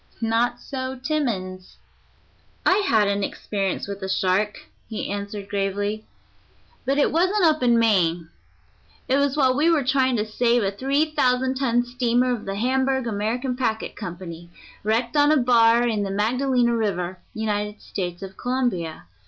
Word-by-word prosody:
Not 230 +2 +1
so 260 0 -5
Timmans. 225 -11 -3 0.9
"I 375 - +5
had 225 - +3
an 200 0 0
experience 195 -1 -3
with 200 0 -6
a 190 - -4
shark," 190 +2 +1 0.3
he 220 -3 -4
answered 200 0 -5
gravely, 205 +2 -2 0.8
"but 275 +2 +1
it 290 - +3
wasn't 370 +5 +2
up 310 -2 +3
in 240 -2 +4
Maine. 175 -7 +2 0.8
It 265 - +2
was 280 0 +1
while 260 -3 +3
we 305 +5 +3
were 320 -4 +3
trying 260 -1 +2
to 210 -2 0
save 235 +2 +1
a 195 - 0
three 275 +8 0
thousand 260 -3 +2
ton 245 -2 +1
steamer 245 0 +1
of 235 - -5
the 195 - -3
Hamburg 265 +3 +1
American 230 +4 -2
Packet 225 -4 -2
Company, 175 -3 -8 0.3
wrecked 230 +4 0
on 290 0 +5
a 310 - +5
bar 240 -1 +4
in 220 -3 0
the 200 - -2
Magdalena 240 +4 +1
River, 185 -5 -2 0.2
United 210 -1 -2
States 175 -1 -5
of 190 0 -8
Colombia. 240 - -2
230 Hz, 155 wpm, -23 LUFS, 200-260 Hz, 0.9 s, I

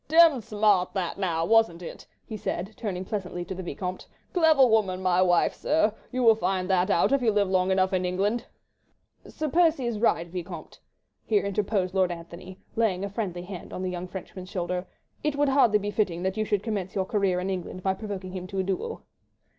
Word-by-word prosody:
"Demmed 320 -4 +6
smart 210 -4 +2
that 185 0 -2
now, 165 -4 0
wasn't 220 -5 +3
it?" - - -9 0.2
he 220 - -6
said, 195 0 -4
turning 190 -5 -4
pleasantly 180 -4 -4
to 190 - -5
the 185 - -6
Vicomte. 180 +1 -5 0.3
"Clever 320 -6 +5
woman 215 -6 +2
my 185 -1 +2
wife, 175 -2 +3
sir.... 305 -8 +1 0.2
You 255 0 -1
will 225 -1 +8
find 190 -4 -1
that 185 +1 +2
out 200 - +3
if 275 -1 +3
you 230 -3 +3
live 205 -1 +2
long 185 0 +2
enough 190 0 +2
in 185 -1 +1
England." 195 +6 -1 0.8
"Sir 310 - -4
Percy 320 -4 +3
is 235 -2 -1
in - - -7
the - - +4
right, 170 - 0
Vicomte," 175 -1 -7 0.4
here 210 -3 +1
interposed 200 -2 0
Lord 185 -2 +2
Antony, 170 +2 -9 0.2
laying 200 -4 +1
a - - -4
friendly 185 -5 -3
hand 180 -1 -8
on 185 - -5
the 185 - -2
young 180 0 -5
Frenchman's 185 0 -8
shoulder. 180 0 -3 0.4
"It 300 -1 0
would 290 0 +2
hardly 265 -6 +5
be 205 0 -3
fitting 185 -5 -1
that 190 0 -1
you 215 - -1
should 205 -2 0
commence 200 -5 -3
your 190 -1 0
career 195 -3 +1
in 190 +2 -2
England 185 0 -5
by 190 - +2
provoking 190 -2 -6
him 185 -1 -6
to 195 +1 -6
a 190 - +1
duel." 195 - -3
190 Hz, 210 wpm, -27 LUFS, 180-220 Hz, 0.8 s, will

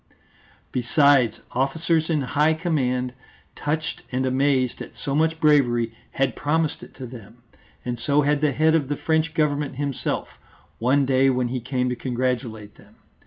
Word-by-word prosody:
Besides, 130 -1 +3
officers 160 +5 0
in 155 -3 +1
high 150 +4 +2
command, 130 -7 -1 0.4
touched 155 +2 -3
and 130 +1 0
amazed 130 -1 +1
at - - -9
so 140 - -3
much 160 +2 +1
bravery, 120 -7 +3 0.2
had 135 -3 0
promised 160 +1 0
it - - -13
to 130 - -7
them, 120 -1 -12 0.4
and 120 -1 -3
so 145 +2 +2
had 145 0 +1
the 150 -1 +3
head 155 +4 +3
of 155 -4 +2
the 145 0 -2
French 160 0 0
Government 145 -3 0
himself, 140 -1 -2 0.5
one 135 +4 +3
day 135 0 +3
when 125 -2 0
he 130 +1 -2
came 125 +1 -1
to 125 - -1
congratulate 120 -4 -3
them. - - -19
135 Hz, 160 wpm, -23 LUFS, 125-150 Hz, 0.5 s, Besides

